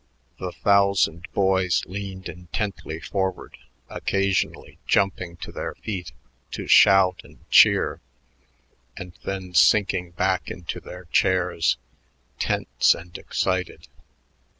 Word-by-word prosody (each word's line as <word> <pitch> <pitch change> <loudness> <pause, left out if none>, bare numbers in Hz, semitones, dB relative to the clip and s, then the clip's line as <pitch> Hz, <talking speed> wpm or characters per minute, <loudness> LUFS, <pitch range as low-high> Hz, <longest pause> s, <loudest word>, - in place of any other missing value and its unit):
The 90 -1 -4
thousand 100 -4 +2
boys 95 -2 +1
leaned 95 0 -7
intently 90 -2 -5
forward, 95 0 -3 0.3
occasionally 95 0 -2
jumping 90 -3 0
to - - -8
their - - -5
feet 90 -7 -6 0.4
to - - -5
shout 95 -2 +5
and - - -19
cheer, - - +5 1.0
and 90 -3 -8
then 95 -2 -5
sinking 95 -2 +3
back 90 +1 -1
into 85 -2 -6
their 90 0 -11
chairs, 90 -5 +2 0.6
tense - - +2
and 85 +1 -12
excited. 95 -1 -2
95 Hz, 105 wpm, -24 LUFS, 90-95 Hz, 1.0 s, shout